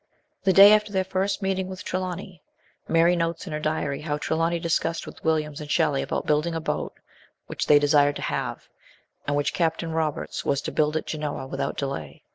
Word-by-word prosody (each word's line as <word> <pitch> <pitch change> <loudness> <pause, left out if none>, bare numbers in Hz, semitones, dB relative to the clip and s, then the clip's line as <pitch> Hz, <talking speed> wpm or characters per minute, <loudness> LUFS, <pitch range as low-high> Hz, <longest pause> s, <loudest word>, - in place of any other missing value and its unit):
The 190 - +5
day 200 +3 +9
after 210 -1 +2
their 190 -2 +1
first 190 +2 -1
meeting 190 -1 -1
with 185 0 -7
Trelawny, 185 -2 -4 0.5
Mary 170 +1 +4
notes 165 0 -2
in 170 - -6
her 150 - -2
diary 155 -2 -2
how 150 -1 -2
Trelawny 165 +3 0
discussed 165 0 -1
with - - -12
Williams 155 -1 0
and 150 - -8
Shelley 150 -4 +2
about - - -3
building 155 +3 +1
a - - -1
boat 160 - -3 0.5
which - - -4
they 150 - +7
desired 145 0 +4
to - - -5
have, - - -3 0.6
and 145 - +1
which 145 0 0
Captain 165 -1 -1
Roberts 160 -2 -2
was 140 - +1
to - - -4
build 150 +1 +1
at - - -4
Genoa 150 -3 -4
without 135 +1 -3
delay. 135 - -5
160 Hz, 195 wpm, -25 LUFS, 150-180 Hz, 0.6 s, day